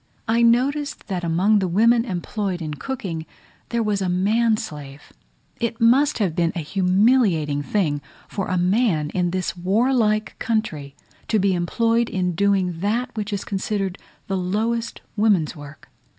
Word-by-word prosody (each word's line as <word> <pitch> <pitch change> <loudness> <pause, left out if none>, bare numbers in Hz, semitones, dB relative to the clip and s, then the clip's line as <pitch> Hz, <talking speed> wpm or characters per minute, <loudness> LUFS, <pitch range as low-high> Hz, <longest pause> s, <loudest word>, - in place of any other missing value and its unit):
I 230 +1 +2
noticed 265 +5 +1
that 180 -2 -2
among 185 +6 +3
the 190 - 0
women 230 +6 +3
employed 190 -1 -3
in 155 -3 -4
cooking, 170 - -5 0.4
there 235 -1 0
was 205 -2 0
a 185 - 0
man 215 +5 +2
slave: 145 -5 -9 0.5
it 235 -1 -2
must 265 +6 +4
be 180 -6 0
a - - -3
humiliating 185 - +2
thing 145 -3 0 0.3
for 195 - -4
a 185 - 0
man 180 -5 +1
in 180 -1 0
this 185 -1 -2
warlike 215 +2 +1
country 155 -11 -2 0.3
to 220 - +2
be 195 -1 +2
employed 230 +6 +1
in 180 -2 -1
doing 185 -2 +1
that 220 +7 -1
which 210 -1 -3
is 200 -2 -2
considered 195 -1 -2
as - - -25 0.2
the 195 - -1
lowest 225 +6 -2
woman's 205 -7 +2
work. 145 0 -12
195 Hz, 150 wpm, -22 LUFS, 175-230 Hz, 0.5 s, must